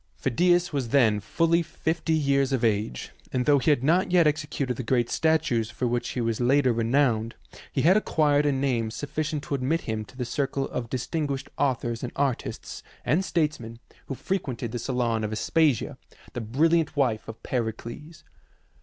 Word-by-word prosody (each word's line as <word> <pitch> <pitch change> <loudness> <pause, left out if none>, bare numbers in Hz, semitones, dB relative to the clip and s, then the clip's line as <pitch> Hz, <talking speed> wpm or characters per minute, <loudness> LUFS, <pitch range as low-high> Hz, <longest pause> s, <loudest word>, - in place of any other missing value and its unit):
Phidias 175 +6 +2
was 135 -5 -2
then 115 -6 +4
fully 165 +9 +1
fifty 160 0 -2
years 140 -2 +2
of 130 -3 0
age, 105 - -1 0.2
and 125 -1 0
though 145 -1 +5
he 145 - +1
had 140 -4 +3
not 175 +6 +2
yet 175 -2 +5
exe 150 0 +1
cuted 135 -4 -2
the - - -2
great 120 0 0
statues 145 -8 +1
for 120 +1 -3
which 120 0 -1
he - - +1
was 115 0 -1
later 130 0 +3
re 115 0 -1
nowned, 115 -2 +1 0.4
he - - -1
had 175 +5 +6
acquired 150 -8 +2
a - - +3
name 130 -5 0
sufficient 150 +4 -3
to - - -5
admit 140 +5 0
him 110 -1 -3
to 125 - -17
the 125 - -2
circle 135 +2 -2
of 120 -2 -4
distinguished 135 +2 -3
authors 120 -4 -1
and 125 - -4
artists 135 -4 -3 0.2
and 175 +5 +2
statesmen 150 -11 -2 0.3
who 135 - -4
frequented 130 - -3
the 120 - -3
salon 120 -3 -1
of 105 - -2
Aspasia, 145 +4 +1 0.3
the 120 - -4
brilliant 155 +8 +1
wife 120 -6 +1
of 110 - -9
Pericles. 120 +6 -5
135 Hz, 180 wpm, -26 LUFS, 120-150 Hz, 0.4 s, had